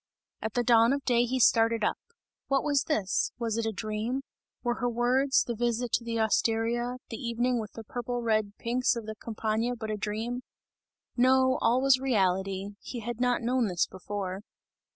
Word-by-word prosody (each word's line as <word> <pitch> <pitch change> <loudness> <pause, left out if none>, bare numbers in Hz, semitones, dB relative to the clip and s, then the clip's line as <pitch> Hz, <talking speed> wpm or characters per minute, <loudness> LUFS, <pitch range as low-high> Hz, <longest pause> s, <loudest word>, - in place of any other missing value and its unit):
At 220 -1 -4
the 245 - +2
dawn 235 +1 +5
of 280 -1 -3
day 240 -1 +3
he 260 +2 -1
started 225 -1 +4
up. - - 0 0.5
What 275 -1 +2
was 285 -2 +1
this? 210 -11 0
Was 230 -3 -2
it 225 - -1
a - - 0
dream? 220 +5 -3 0.4
Were 240 -1 -1
her 245 - +1
words, 250 +3 +2
the 240 - -3
visit 240 +1 -1
to 235 - +1
the 230 -1 -2
osteria, 230 +2 +1 0.2
the 225 - -4
evening 240 +1 0
with 215 -2 -6
the 225 - -8
purple 245 +2 -4
red 215 -2 0
pinks 245 +2 +1
of 230 -2 -5
the 220 - -5
Campagna 220 +2 -2
but 220 -2 -5
a 215 - -2
dream? 220 +4 -3 0.7
No, 260 +1 +4
all 250 +3 +3
was 270 -1 +5
reality; 195 -5 0
he 240 - -7
had 240 +2 -5
not 245 -1 +1
known 245 -1 +1
this 180 -3 +1
before. 190 0 -5
235 Hz, 185 wpm, -28 LUFS, 220-245 Hz, 0.7 s, dawn